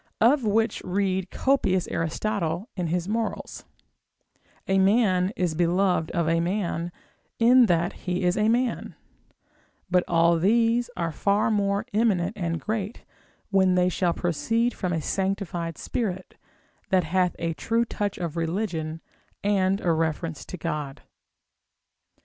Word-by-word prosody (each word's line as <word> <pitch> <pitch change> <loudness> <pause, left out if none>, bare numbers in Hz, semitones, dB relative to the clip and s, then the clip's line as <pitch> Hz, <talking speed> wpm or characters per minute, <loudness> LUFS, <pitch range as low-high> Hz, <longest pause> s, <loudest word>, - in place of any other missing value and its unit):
of 255 +4 +4
which 220 +1 +1
read 190 0 -1
copious 220 -10 +1
Aristotle 175 +3 -2
in 180 -3 -2
his 175 +2 -1
morals; 225 +1 -3 1.0
a 195 0 +3
man 190 -2 +3
is 180 -3 0
beloved 175 0 +1
of 170 -2 -1
a 165 +1 +2
man, 175 -1 -2 0.5
in 240 +1 +6
that 175 -1 +1
he 180 0 -3
is 180 0 +2
a 215 +1 +2
man; 240 +1 0 1.0
but 180 0 +4
all 170 0 +3
these 230 +5 +2
are 170 -2 -1
far 200 +7 +1
more 200 0 0
eminent 205 -5 +2
and 170 -4 -2
great, 215 - -4 0.5
when 190 -2 +4
they 180 0 +3
shall 180 -1 +1
proceed 225 +8 0
from 180 - -3
a 165 -3 -1
sanctified 190 -4 -2
spirit, 190 -6 -4 0.5
that 185 -1 +3
hath 180 +2 +1
a 165 -1 -2
true 230 +7 0
touch 205 -3 -3
of 170 -3 -4
religion, 165 -2 -2 0.4
and 195 -1 +2
a 175 - +1
reference 160 0 -1
to 180 - -7
God. 150 -4 -4
185 Hz, 135 wpm, -25 LUFS, 170-210 Hz, 1.0 s, in